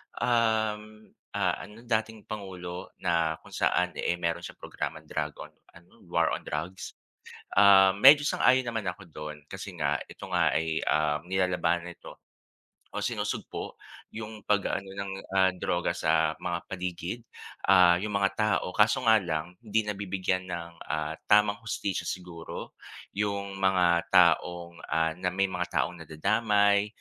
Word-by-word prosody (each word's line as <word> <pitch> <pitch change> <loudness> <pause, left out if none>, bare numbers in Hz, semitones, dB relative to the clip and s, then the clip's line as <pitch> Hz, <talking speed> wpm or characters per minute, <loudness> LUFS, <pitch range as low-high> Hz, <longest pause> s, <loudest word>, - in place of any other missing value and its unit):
um, 110 -2 0 0.2
ah, - - +1
ano 105 +3 -11
dating 110 -2 -2
Pangulo 90 -4 -7
na 85 -2 +1
kung - - -15
saan 90 0 +1
eh 85 - 0
meron 85 -1 -1
siyang - - -10
programang - - -5
drug 75 -2 -3
on - - -13 0.2
ano, 85 +1 -18 0.2
War - - +2
on - - -8
Drugs. 85 +5 -5 0.6
Ah, 95 -1 +7
medyo 140 +7 +8
sang-ayon 130 +1 +4
naman 115 -2 -2
ako 90 +2 -4
dun 75 -1 -8
kasi - - -6
nga - - 0
ito - - -13
nga - - +3
ay, 80 0 0
ah, 75 -1 +2
nilalaban 90 -2 +1
nito 85 - -11 0.8
o - - -1
sinusugpo - - -3 0.4
yung 110 -1 -7
pag-a-ano 100 -1 0
ng 100 0 -4 0.5
droga 85 -1 0
sa 80 0 +2
mga 85 -1 -2
paligid, 90 +3 -4 0.5
ah, 90 -2 +7
yung 105 -1 -3
mga 100 -1 +2
tao. 105 -3 +1
Kaso 110 +4 +3
nga 110 0 +7
lang, 85 +1 -3
hindi 110 0 +1
nabibigyan 95 -2 -2
ng, 85 -1 -5 0.2
ah, 80 +1 -2
tamang 105 0 +4
hustisya 100 -3 -2
siguro, 90 -2 -6 0.4
yung 100 -1 -2
mga 90 -2 +3
taong, 85 -1 +3
ah, 80 +1 +1
na 90 - -1
may 95 +2 +1
mga 90 -1 -2
taong 90 - -3
nadadamay, 100 +6 +2
95 Hz, 140 wpm, -28 LUFS, 85-105 Hz, 0.8 s, medyo